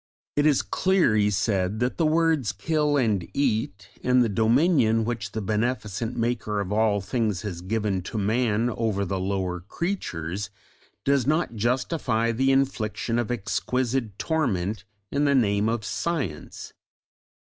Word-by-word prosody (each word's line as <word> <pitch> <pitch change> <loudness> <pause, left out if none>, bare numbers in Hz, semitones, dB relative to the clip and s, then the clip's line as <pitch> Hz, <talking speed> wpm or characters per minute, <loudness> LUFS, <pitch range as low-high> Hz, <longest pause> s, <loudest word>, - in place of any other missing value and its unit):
"It 145 +1 +3
is 145 -4 +3
clear," 185 - +2
he 105 -1 +3
said, 100 0 0
"that 125 +1 -1
the 165 - +3
words 155 -8 +2
'kill 150 - +1
and 105 -9 +1
eat,' 110 -7 -1 0.2
and 125 0 +4
the 115 - 0
dominion 115 - +3
which 110 -4 -3
the 110 - -3
beneficent 110 +1 -2
Maker 115 -3 -1
of 100 -1 -3
all 105 -1 +2
things 105 -2 -1
has 90 -5 -5
given 100 0 -1
to - - -5
man 110 +2 +1
over 110 -3 -1
the 95 +1 -2
lower 95 -2 -2
creatures, 100 - -4 0.6
does 140 -2 +2
not 155 -5 +1
justify 115 0 0
the 135 +4 +2
infliction 120 -3 0
of 120 - -2
exquisite 120 0 -1
torment 110 - -1 0.3
in 145 +1 +1
the 140 -1 +3
name 105 -3 +2
of 115 -2 -2
Science." 135 - -4
115 Hz, 145 wpm, -25 LUFS, 100-130 Hz, 0.6 s, and